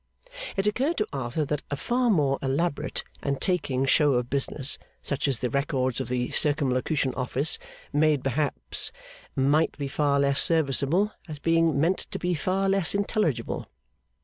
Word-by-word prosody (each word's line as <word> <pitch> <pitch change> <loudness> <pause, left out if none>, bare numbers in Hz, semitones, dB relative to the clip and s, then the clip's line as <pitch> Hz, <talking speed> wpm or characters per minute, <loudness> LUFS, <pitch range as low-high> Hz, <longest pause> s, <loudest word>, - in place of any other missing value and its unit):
It 195 - +1
occurred 265 +10 0
to 215 - +1
Arthur 135 +3 -2
that 150 +1 -2
a 145 - -1
far 240 - 0
more 145 -9 +2
elaborate 140 +4 -1 0.2
and 140 -1 -2
taking 145 -8 0
show 145 +1 +4
of 125 -1 -1
business 140 0 0 0.2
such 140 0 -1
as 135 -4 +1
the 125 - -2
records 130 -2 0
of 130 - -4
the 125 0 -1
Circumlocution 140 -1 +1
Office 130 +4 0 0.3
made 150 -2 +3
perhaps 140 +2 0 0.4
might 145 +4 +2
be 140 -2 -3
far 140 0 +1
less 140 0 +3
serviceable, 160 +5 +3 0.2
as 155 -2 -6
being 165 -1 +2
meant 170 +5 +2
to - - -4
be 180 0 -1
far 185 +5 0
less 195 -1 +2
intelligible. 200 - -1
145 Hz, 155 wpm, -26 LUFS, 135-165 Hz, 0.4 s, show